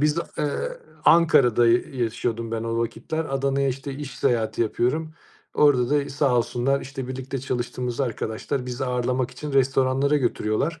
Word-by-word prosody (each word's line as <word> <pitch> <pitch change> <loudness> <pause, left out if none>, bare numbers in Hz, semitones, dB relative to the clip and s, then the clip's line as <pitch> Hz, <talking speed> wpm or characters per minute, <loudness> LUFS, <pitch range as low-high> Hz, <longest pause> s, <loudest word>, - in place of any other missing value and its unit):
biz 150 +2 +2
a - - -2
eee, 150 -2 +1 0.6
Ankara'da 135 -8 +5
y 115 +1 +4 0.2
yaşıyordum 115 0 -3
ben 115 -1 -2
o 115 0 -1
vakitler. 155 +7 -2
Adana'ya, 135 -1 0
işte, 135 +2 -4
iş 135 -3 -7
seyahati 115 -1 +1
yapıyorum. 155 +8 -1 0.4
Orada 130 -4 +4
da 145 -1 +1
sağ 140 -3 +1
olsunlar, 125 +3 0
işte, 135 -2 -6
birlikte 130 +1 -4
çalıştığımız 125 -1 -3
arkadaşlar 125 +1 -2
bizi 125 +2 -3
ağırlamak 125 0 -1
için 150 -1 -7
restoranlara 135 +1 +2
götürüyorlar, 130 +4 -1
130 Hz, 150 wpm, -24 LUFS, 120-140 Hz, 0.6 s, Ankara'da